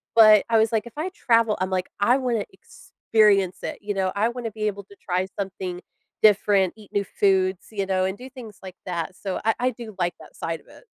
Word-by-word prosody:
But 215 -2 +8
I 230 - +4
was 220 0 +3
like, 225 0 0
"If - - -12
I 340 +5 -2
travel," 230 - +2
I'm 185 - 0
like, 185 -1 -1
"I 240 +5 +4
wanna 240 -6 -1
experience 200 -4 +1
it," - - -4
you 205 0 -3
know? 190 -1 0
I 215 +3 +2
wanna 240 -2 -5
be 215 0 -4
able 200 -1 -4
to 200 - -17
try 185 -1 -2
something 185 -2 -4 0.4
different, 200 -3 +4
eat 215 -2 -16
new 205 - 0
foods, 190 -1 +1
you 200 -3 -2
know, 185 -1 +1
and 190 +1 -3
do 255 - -9
things 245 -6 -11
like 185 -1 -9
that. 175 -1 -4
So 190 0 -4
I 225 - +4
I 250 - +2
do 225 -3 -10
like 175 0 0
that - - -15
side 165 -1 -4
of - - -29
it. - - -17
205 Hz, 230 wpm, -24 LUFS, 190-225 Hz, 0.4 s, But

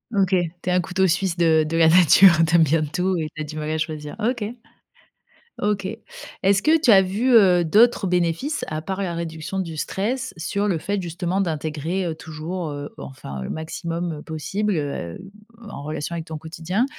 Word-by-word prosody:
OK. 195 -2 +3 0.3
Tu - - -3
es - - +2
un 180 - +3
couteau 190 +1 0
suisse 180 +1 0
de 160 -2 +3
de 165 - -3
la 160 -1 +6
nature. 185 +2 +7 0.2
Tu 165 - +2
aimes 165 - +6
bien 155 +1 +2
tout 180 +4 -1
et 155 - -2
tu 155 - -5
as - - -2
du 155 +1 -8
mal 155 0 -3
à 155 - -1
choisir. 155 -2 -4
OK. 230 0 -2 1.0
OK. 205 -2 0 0.6
Est-ce 195 +1 +4
que 320 +5 +4
tu 275 -6 +4
as 195 -2 +8
vu, 205 +7 0
heu, 180 -5 +6
d'autres 215 +6 +4
bénéfices 180 - 0
à 155 - -3
part 190 +3 -3
la 175 -3 -2
réduction 165 +2 -5
du 165 -4 -4
stress 235 - -2
sur 200 +5 -1
le 180 - +1
fait 200 +5 -2
justement 175 +2 -2
d'intégrer, 160 +1 -2
heu, 165 - -2
toujours- 160 +2 -6
heu, 145 0 -6
enfin 70 - -8
le 65 - -5
maximum, 165 +1 -4
heu, - - -10
possible, 195 +7 -2
heu, 140 - -4 0.5
en 170 - -8
relation 155 +2 -4
avec 165 -1 -4
ton 160 -1 -6
quotidien- 165 +8 -2
170 Hz, 200 wpm, -22 LUFS, 160-195 Hz, 1.0 s, as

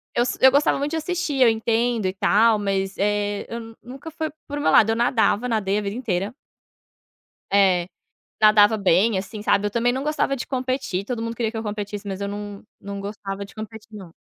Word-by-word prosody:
Eu 240 - +3
s 245 - -2
eu 265 0 +7
gostava 285 0 +3
muito 285 +2 -2
de 325 - -1
assistir. 320 -4 -2
Eu 240 - +7
entendo 225 0 0
e 185 - -2
tal, 215 +3 +3
mas, 195 -1 -1
eh, 205 0 -1
eu 225 -1 -7
nunca 270 +6 -10
foi 315 0 -3 0.2
por 290 0 -4
meu - - +2
lado. 225 - +5
Eu - - 0
nadava, 235 -1 +2
nadei 205 -3 0
a - - -3
vida 200 +1 -4
inteira 200 -5 -2 1.2
É. 185 -3 +3 0.5
Nadava 215 0 +6
bem, 195 +2 +3
assim, 205 +2 -6
sabe. 205 -1 +2
Eu - - -5
também 240 +2 +1
não 265 +2 -3
gostava 300 -2 0
de 255 - -5
competir. 255 -7 -2
Todo 240 -1 -4
mundo 230 0 -4
queria 225 -2 -1
que 225 - -6
eu 225 - -4
competisse, 205 -1 -5
mas 195 0 -5
eu 200 - -2
não 205 0 -7 0.2
não 200 0 -7
gostava 200 -1 -6
de 195 - -17
competir 220 0 -9
não. 180 -5 -11
220 Hz, 210 wpm, -23 LUFS, 200-245 Hz, 1.2 s, eu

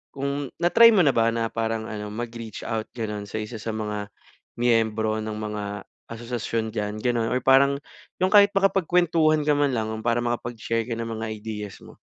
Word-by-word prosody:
kung 140 +1 -2
na 175 - +4
try 230 0 +9
mo 190 - +6
na 140 - +5
ba 115 0 +3
na 115 0 0
parang 115 -1 -2
ano 105 -1 -5
mag-reach 115 -1 -6
out 110 -1 -2
gano'n 105 -3 -4
sa 110 - -4
isa 110 +2 -6
sa 115 - -3
mga 105 -1 -3 0.5
miyembro 110 -2 +2
ng 110 0 -4
mga 105 -1 -4 0.5
asosasyon 115 -1 -3
diyan, 105 0 -3
ganon? 120 -2 0
Or 125 - +2
parang 140 +2 +4 0.4
yung 185 - +3
kahit 205 -1 +7
makapagkwentuhan 175 -5 +3
ka 150 - +5
man 145 -1 +2
lang, 110 -1 -1 0.2
para 115 0 +2
makapag 120 0 -3
share 115 0 -1
ka 120 - -2
ng 115 0 -4
mga 110 - -3 0.2
ideas 105 -3 -6
mo. - - -14
115 Hz, 190 wpm, -25 LUFS, 110-135 Hz, 0.5 s, try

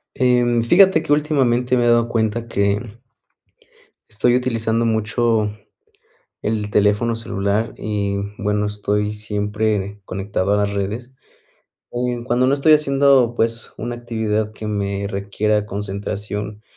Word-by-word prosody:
Em, 125 -2 +2
fíjate 185 +4 +5
que - - 0
últimamente 130 -5 +2
me 120 - +2
he - - +3
dado 120 0 +3
cuenta 115 0 -1
que 100 -1 +1 1.3
estoy 120 +3 +2
utilizando 115 -2 0
mucho 110 -1 +1 0.9
el 105 -1 -2
teléfono 105 +3 +2
celular 105 -1 -2
y 100 -2 -2 0.2
bueno, 105 0 0
estoy 105 0 -1
siempre 105 -1 -2
conectado 95 +1 -1
a - - +3
las 100 0 0
redes. 105 +6 -4 0.8
Em, 120 0 -2
cuando 125 +1 +2
no 135 - +3
estoy 150 +2 +5
haciendo, 140 -4 +3
pues 115 0 -1
una 120 +1 -4
actividad 110 -2 -2
que 110 0 -6
me 100 -1 -2
requiera 105 +1 -1
concentración 105 +1 -5
110 Hz, 125 wpm, -20 LUFS, 105-120 Hz, 1.3 s, fíjate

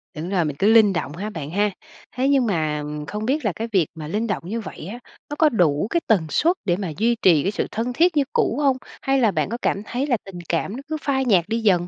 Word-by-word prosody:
Đúng 165 +4 -5
rồi 180 -5 +1
mình 150 - -3
cứ 200 - +3
linh 210 -4 +6
động 160 -3 -3
ha 205 +4 -4
bạn 155 -7 -6
ha. 205 +2 +1 0.4
Thế 265 +2 +1
nhưng 270 -3 +3
mà 155 -6 -1 0.2
không 210 +1 -4
biết 275 +1 0
là 205 - +2
cái 225 +1 -3
việc 180 -7 +3
mà 155 -2 -7
linh 215 +7 -1
động 205 -5 -2
như 225 +5 -3
vậy 175 - -8
á, 240 - -7 0.3
nó 295 - -4
có 315 - +6
đủ 175 - +2
cái 340 - +1
tần 185 -8 +3
suất 335 - +2
để 175 - +2
mà 190 -4 -4
duy 235 +4 +2
trì 165 -6 +5
cái 195 - 0
sự - - -2
thân 235 +3 -2
thiết 340 +2 +3
như 285 - +5
cũ 235 - +1
hông? 270 -2 +3 0.2
Hay 270 0 +2
là 225 -5 +3
bạn - - -1
có 235 - -3
cảm 200 - 0
thấy 260 +6 -2
là 245 -4 +2
tình 190 -3 -9
cảm 175 +5 -1
nó 270 - -6
cứ 315 - -2
phai 265 -2 0
nhạt 185 -8 +3
đi 230 +1 0
dần? 210 -4 +4
210 Hz, 280 wpm, -22 LUFS, 175-250 Hz, 0.4 s, linh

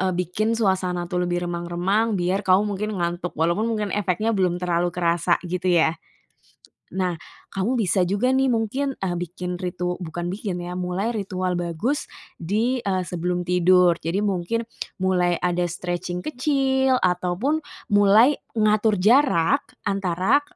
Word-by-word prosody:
eee, 185 0 +1
bikin 215 +6 0
suasana 185 -4 0
tuh 180 0 -2
lebih 175 0 -1
remang-remang 175 +6 0
biar 185 +2 0
kamu 190 +1 +3
mungkin 210 +1 -3
ngantuk. 175 0 -3
Walaupun 170 +8 +1
mungkin 210 -4 -2
efeknya 210 +2 0
belum 185 -4 +1
terlalu 175 -1 0
kerasa 170 0 +1
gitu 180 +1 -2
ya. 170 -3 +4 1.1
Nah 180 -2 0 0.4
kamu 220 +7 0
bisa 195 -3 +2
juga 205 +8 +1
nih 265 0 +3
mungkin, 255 +4 -1
eee, 185 -2 -2
bikin 180 +1 -5
ritu 180 0 -2
bukan 175 +1 -5
bikin 190 0 -3
ya, 175 0 -5
mulai 185 +5 -2
ritual 185 -3 -2
bagus 175 - -2 0.2
di, 225 +9 -1
eee, 190 -2 0
sebelum 175 0 -2
tidur. 180 0 +4
Jadi 165 +5 -1
mungkin, 200 +4 -1 0.3
mulai 180 -2 +1
ada 180 0 0
stretching 175 +1 -4
kecil 265 +2 +1
ataupun 185 - 0 0.3
mulai 210 +7 +6 0.2
ngatur 215 -1 +3
jarak 255 - +3 0.2
antara 195 +6 +1
185 Hz, 140 wpm, -23 LUFS, 175-215 Hz, 1.1 s, mulai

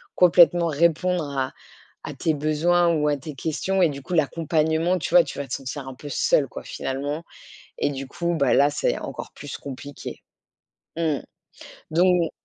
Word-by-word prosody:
complètement 175 -1 +6
répondre 170 +3 +2
à 130 -1 -1 0.5
à - - -5
tes 160 +4 0
besoins 155 +4 +2
ou 150 -2 +1
à 145 - +2
tes 150 +3 -8
questions. 165 +7 -1
Et 175 - +6
du 140 -1 -6
coup, 160 - -7
l'accompagnement, 160 +2 +1
tu 160 - -4
vois, 175 -1 +8
tu 145 - -8
vas 140 - -4
te - - -6
sentir 135 +1 -5
un 135 - -6
peu 145 +3 -9
seul 140 0 +2
quoi - - -8
finalement. 145 +4 -4 0.5
Et - - +1
du 135 -1 -6
coup, 170 +5 -2
bah, 140 -5 +2
là, 140 +1 +5
c'est 145 - 0
encore - - -7
plus 145 -1 -8
compliqué. 140 0 -8 0.7
Mmh. 160 -4 0 0.7
Don 175 0 +3
155 Hz, 175 wpm, -24 LUFS, 140-170 Hz, 0.7 s, vois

